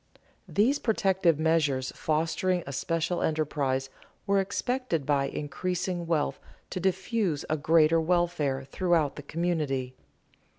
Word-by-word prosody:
These 245 +8 +2
protective 190 -8 +2
measures 150 -5 +1
fostering 165 +3 0
a 140 - -6
special 165 +5 -1
enterprise 140 -4 -1 0.3
were 200 0 +3
expected 195 - -1
by 140 -1 +2
increasing 175 +5 -3
wealth 160 -3 0 0.3
to - - -3
diffuse 190 -3 0
a - - +3
greater 160 +1 +4
welfare 160 -5 0
throughout 160 +1 +1
the - - -7
community. 145 -5 -2
165 Hz, 115 wpm, -28 LUFS, 145-180 Hz, 0.3 s, greater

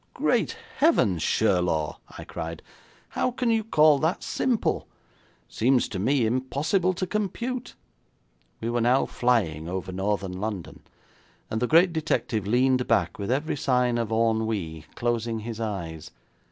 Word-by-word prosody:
'Great - - +1 0.2
heavens, 90 -5 +3
Sherlaw!' 90 -7 +1 0.2
I - - -7
cried. 80 0 -6 0.5
'How - - 0
can 245 -1 0
you 225 -1 +2
call 155 -8 +5
that 160 +6 0
simple? 245 -4 0 0.6
It - - -24
seems 125 +2 +3
to 95 - -4
me 130 +4 +2
impossible 140 - 0
to 185 - -2
compute.' 235 +6 -3 0.9
We 115 +1 -2
were 120 0 0
now 125 +3 +3
flying 90 -11 0
over 95 +1 -4
Northern 95 -1 -2
London, 105 -4 -5 0.7
and 110 - -1
the 125 - +2
great 170 +4 +5
detective 125 - -1
leaned 125 +2 +2
back 115 - +1
with 100 - -3
every 145 +6 0
sign 125 -3 +1
of 115 -2 -2
ennui, 110 -8 0
closing 115 -2 -1
his 115 0 -6
eyes. 85 -8 -4
115 Hz, 140 wpm, -26 LUFS, 100-145 Hz, 0.9 s, call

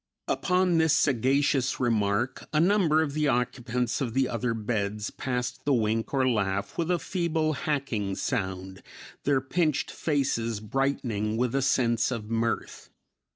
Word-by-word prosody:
Upon 180 -2 +2
this 160 -2 +4
sagacious 135 0 +2
remark, 115 +1 0
a 150 - +2
number 170 -3 +4
of 145 -3 -3
the 150 0 +1
occupants 125 -1 -1
of 120 -3 -2
the 135 -1 +3
other 115 0 -1
beds 105 -2 -2
passed 125 -1 -3
the 140 -2 +2
wink 110 0 0
or 130 -2 +2
laugh 100 -5 -1
with 170 0 -1
a 180 - +3
feeble, 165 -3 -1
hacking 135 - -2
sound; 95 -6 -3 0.4
their 140 -2 +3
pinched 155 +2 0
faces 115 -7 -1
brightening 110 -2 -1
with 125 0 0
a 135 - +1
sense 120 -3 +2
of 115 -4 -5
mirth. 115 0 -2
125 Hz, 145 wpm, -27 LUFS, 115-145 Hz, 0.4 s, this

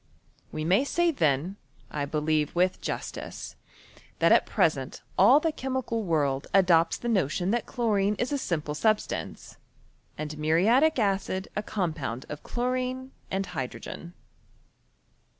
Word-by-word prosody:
We 155 0 -3
may 190 +9 +4
say 345 +4 +2
then, 160 - 0 0.3
1 145 -1 -3
believe 155 0 0
with 180 +1 +2
jas - - -3
tice, - - -8 0.6
that - - +4
at - - +5
present - - 0
all 290 - +7
the 325 +1 0
chemical 260 -5 -2
world 145 -6 0
adopts 175 -4 +4
the 240 - -6
notion, 185 - +1
that 240 +1 -1
chlorine 210 -4 +1
is 245 +6 -2
a 285 - 0
simple 155 - -2
substance, 215 +7 -1 0.6
and 155 0 -5
muriatic 220 - +3
acid 195 -3 0
a 210 - 0
compound 155 - -3
of 150 - -6
chlorine 255 +1 -2 0.2
and 195 +1 -1
hydrogen. 170 +2 -6
190 Hz, 135 wpm, -27 LUFS, 155-240 Hz, 0.6 s, all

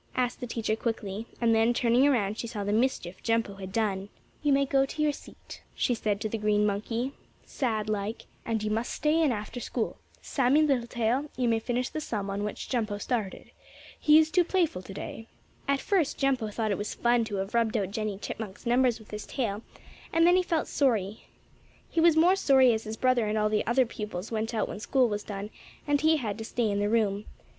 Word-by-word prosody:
asked 250 -1 0
the 245 - -5
teacher 225 -2 -1
quickly, 220 -2 -3
and 230 -1 +3
then, 225 +2 +3
turning 245 +3 +4
around, 215 -7 +1
she 235 - -4
saw 215 -3 -4
the 205 +1 -1
mischief 215 -6 0
Jumpo 225 -4 0
had 190 -1 -7
done. 200 -2 -1 0.3
"You 295 - +2
may 275 0 +4
go 270 0 +3
to 270 +3 -6
your 300 - +3
seat," 285 - -12
she 245 - +1
said 210 -3 -1
to - - -1
the 220 +1 -3
green 210 0 +2
monkey, 225 +5 -1 0.3
sad 220 -6 -2
like, 215 +1 -3 0.2
"and 225 -2 -2
you 215 - -1
must 225 +3 -1
stay 310 +2 +1
in 305 -4 +3
after 215 +2 -4
school. 235 -1 -3 0.2
Sammie 275 +3 +2
Littletail, 245 0 0
you 250 -2 +1
may 225 -1 +2
finish 245 +2 -2
the 310 - -4
sum 205 -8 -3
on 200 +1 -2
which 210 - -4
Jumpo 220 -5 -1
started. 215 -5 -3 0.5
He 300 0 +6
is 315 0 +4
too 360 +1 +4
playful 340 - 0
today." 200 +4 -8 0.4
At 280 0 +2
first 355 -5 +1
Jumpo 265 -6 +1
thought 220 0 -1
it 200 - -1
was 205 - -4
fun 240 0 +2
to 215 -2 -4
have 195 +2 -3
rubbed 230 -1 +2
out 195 -2 -2
Jennie 215 -2 -3
Chipmunk's 205 -1 -7
numbers 245 0 +3
with 220 -2 -16
his 210 0 -6
tail, 215 -6 -2 0.5
and 330 0 +4
then 350 +1 +6
he 370 - +4
felt 335 -3 -1
sorry. 220 -7 0 0.7
He 330 - +2
was 330 -1 +5
more 350 +4 +6
sorry 265 -9 +5
as 220 0 -3
his 215 +1 -5
brother 255 -3 +2
and 215 +1 0
all 215 0 +2
the 215 0 0
other 250 +2 +4
pupils 210 -3 -6
went 225 +1 -2
out 215 - 0
when - - -6
school 255 +3 +2
was 205 -2 -2
done, 205 0 -6 0.3
and 290 -1 +2
he 315 +1 +4
had 220 -6 -3
to - - -4
stay 225 -1 -1
in 200 - 0
the 205 0 +1
room. 210 -2 +1
230 Hz, 220 wpm, -28 LUFS, 210-260 Hz, 0.7 s, He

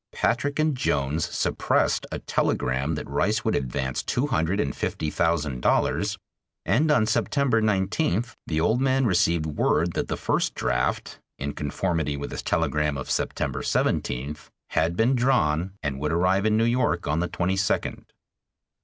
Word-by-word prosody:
Patrick 145 +4 0
and 155 -2 +2
Jones 75 - 0
suppressed - - 0
a - - -2
telegram 65 +5 0
that - - -5
Rice - - 0
would - - +2
advance 65 +1 -2
two 125 - -1
hundred 95 - 0
and 70 - -1
fifty 75 - -2
thousand 80 -6 0
dollars, - - +1 0.5
and 155 +6 +2
on 145 -8 +4
September 120 +2 +1
19th 110 +4 0
the 80 -1 0
old 110 +9 +2
man 135 0 +2
received 85 -5 +2
word 80 +2 +1
that - - -2
the - - -3
first - - 0
draft - - -1 0.2
in 70 +1 -4
conformity 75 -1 -2
with 70 - -5
his - - -4
telegram 75 -2 0
of 65 - -5
September - - -1
17th 70 +5 -1 0.2
had 85 +2 +1
been 120 +4 +3
drawn 95 - +1
and 70 -2 -2
would 75 +2 -1
arrive 90 +5 +2
in 110 0 +3
New 115 - +3
York 120 -8 +1
on 75 +2 +1
the 90 +1 -1
22d. 95 +2 -1
85 Hz, 155 wpm, -25 LUFS, 75-115 Hz, 0.5 s, on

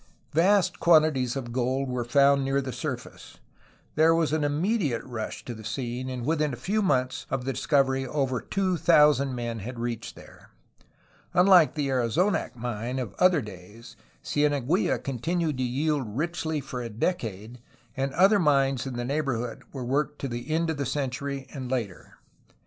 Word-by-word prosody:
Vast 185 +4 +3
quantities 155 -7 +4
of 125 -3 -5
gold 130 +2 -1
were 125 -1 -2
found 140 +3 +4
near 135 +1 +1
the 130 -2 -4
surface. - - -6 0.6
There 160 +2 +4
was 165 -2 +1
an 155 -1 +1
immediate 150 - 0
rush 120 -4 -6
to 120 - -5
the 110 -1 -10
scene, 120 +3 -4
and 125 -2 -5
within 150 -2 0
a - - -5
few 215 +3 -1
months 130 -9 0
of 130 -2 -2
the 135 - -1
discovery 135 -1 +1
over 130 -3 -1
two 185 - -1
thousand 150 -5 +4
men 120 -2 -4
had 120 +5 -7
reached 115 -1 -4
there. - - -16 0.9
Unlike 180 -3 +6
the 145 -3 -1
Arizonac 130 - 0
mine 120 +1 -4
of 125 -5 -4
other 180 -4 +5
days 105 +4 -12 0.3
Cieneguilla 145 - +1
continued 155 +3 -1
to - - +1
yield 130 -3 -1
richly 160 -1 -2
for 130 -2 -6
a 120 - -5
decade, 115 - -3 0.4
and 135 +1 -1
other 195 +6 +5
mines 135 -5 +2
in 130 - -5
the 120 0 -3
neighborhood 125 -5 -2
were 130 -3 -6
worked 145 +3 -1
to 140 - -2
the 120 +3 -6
end 165 +1 +1
of 160 - -4
the 140 - -2
century 135 0 -3
and 130 -3 -6
later. 115 -8 -4
135 Hz, 165 wpm, -26 LUFS, 125-155 Hz, 0.9 s, Unlike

